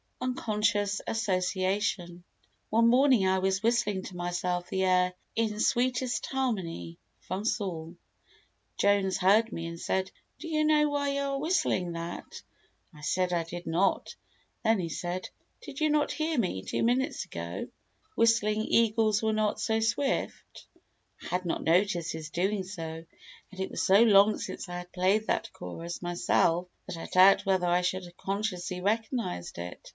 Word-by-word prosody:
Unconscious 210 -4 0
Association 185 -3 -1 0.5
One 230 +1 +4
morning 250 -4 +5
I 190 0 +2
was 190 +2 0
whistling 220 -5 +1
to 185 - -9
myself 175 0 -2
the 190 0 0
air 180 -1 +3 0.2
"In 220 -2 0
Sweetest 245 0 +1
Harmony" 195 -11 -3 0.2
from 185 +3 -4
Saul. 175 -7 -2 0.8
Jones 200 -2 +2
heard 210 +5 +4
me 165 - -5
and 170 0 -7
said: 190 +2 -1 0.3
"Do 335 - -7
you 310 -1 +1
know 300 -1 +4
why 285 -1 0
you 280 0 -1
are 275 -1 -1
whistling 275 - 0
that?" 170 +1 -7 0.5
I 150 - -14
said 180 +3 0
I 170 -1 +1
did 175 +2 -8
not. 175 +4 0 0.5
Then 225 -2 +3
he 170 -2 -2
said: 175 +3 -4 0.3
"Did 280 -3 -9
you 310 -1 +2
not 300 0 +2
hear 315 -1 -1
me, 180 - -1
two - - -2
minutes 255 +5 +1
ago, - - -6 0.5
whistling 215 -2 +3
'Eagles 220 -2 +2
were 220 0 +2
not 215 -1 0
so 220 +1 +1
Swift'?" 240 +5 -2 0.6
I - - -7
had 180 +1 -2
not 170 - -2
noticed 175 0 +2
his 160 -1 -6
doing 190 +4 0
so, 165 -4 -7 0.5
and 190 - -12
it 190 - -3
was - - -2
so 195 +3 +6
long 210 -2 +6
since - - -6
I 175 - -4
had 180 0 -10
played 195 +4 +2
that - - -1
chorus 165 - -7
myself 175 0 +1 0.2
that - - -5
I 165 - -6
doubt 190 +3 +6
whether 190 -2 +2
I 175 +1 +3
should 185 +1 -1
have 175 0 -14
consciously 185 -3 -3
recognised 220 - -2
it. 90 +1 -8
195 Hz, 160 wpm, -29 LUFS, 175-225 Hz, 0.8 s, so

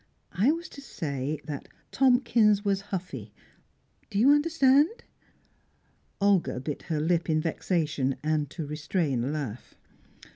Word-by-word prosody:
I 205 - +3
was 335 +2 -4
to 280 - -11
say 145 - -4
that 145 -3 -6 0.2
Tomkins 235 -5 +3
was 195 -1 +1
huffy. 140 - -5 0.8
Do 200 - -4
you 250 +7 +6
understand?" 295 - +3 1.2
Olga 200 -9 +2
bit 140 +2 -5
her 155 -2 0
lip 170 +2 0
in 155 0 +3
vexation, 155 -4 -1
and 155 -2 0
to 160 0 -6
restrain 150 -3 -1
a - - -2
laugh. 140 -6 -5
170 Hz, 125 wpm, -27 LUFS, 150-230 Hz, 1.2 s, you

